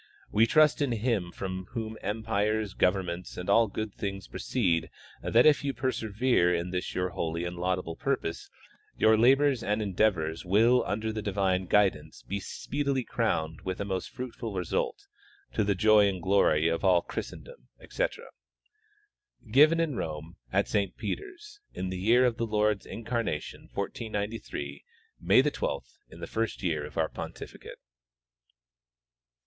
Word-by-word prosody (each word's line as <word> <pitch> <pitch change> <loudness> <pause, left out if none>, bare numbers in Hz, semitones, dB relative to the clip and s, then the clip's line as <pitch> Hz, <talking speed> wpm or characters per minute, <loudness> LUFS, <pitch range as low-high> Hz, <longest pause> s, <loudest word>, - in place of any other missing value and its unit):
We 110 +2 +4
trust 155 +3 +4
in 140 -4 +1
Him 110 -6 -1
from 95 0 -5
whom 110 -2 -4
empires, 105 0 -1
governments 90 -2 -1
and 90 - -5
all 115 +3 +5
goods 105 +1 -4
things 100 -3 -5
proceed 90 -10 0 0.3
that 120 +2 +4
if 150 -2 +5
you 140 -1 -2
persevere 115 -6 +1
in 85 +1 -3
this 90 0 -3
your 90 0 0
holy 85 -1 -3
and 85 0 -4
laudable 90 -1 -2
purpose 130 -12 -2 0.5
your 110 0 +5
labors 135 +3 +4
and 105 -1 0
endeavors 95 -6 0
will 115 +7 +4
under 110 +2 -2
the 110 - -3
divine 95 -3 0
guidance 105 -1 +1
be 100 +1 -3
speedily 140 +5 -2
crowned 80 -10 -1
with 95 -1 -4
a 100 - -2
most 95 -2 -3
fruitful 115 -4 -6
result, 90 -2 -2 0.5
to - - +1
the 100 -1 +1
joy 105 +1 +5
and 95 -3 -3
glory 85 -5 +3
of 85 0 -1
all 90 -3 +4
Christendom, - - -8
etc. - - -3 1.3
Given 155 +6 +6
in 160 -6 0
Rome, 80 +1 -5 0.2
at - - +2
Saint 100 -2 -1
Peter's, 400 +1 -6 0.2
in 95 - -3
the 95 0 -4
year 120 +6 +4
of 120 -2 +1
the 115 - -1
Lord's 105 -1 +1
incarnation 115 -8 -4
1493, 105 -10 -4 0.4
May - - +5
12, - - -2 0.2
in - - -13
tlie - - -6
first 115 -2 -2
year 75 -5 -1
of - - -13
our 80 -1 +2
pontificate. - - -8
105 Hz, 150 wpm, -29 LUFS, 90-115 Hz, 1.3 s, Given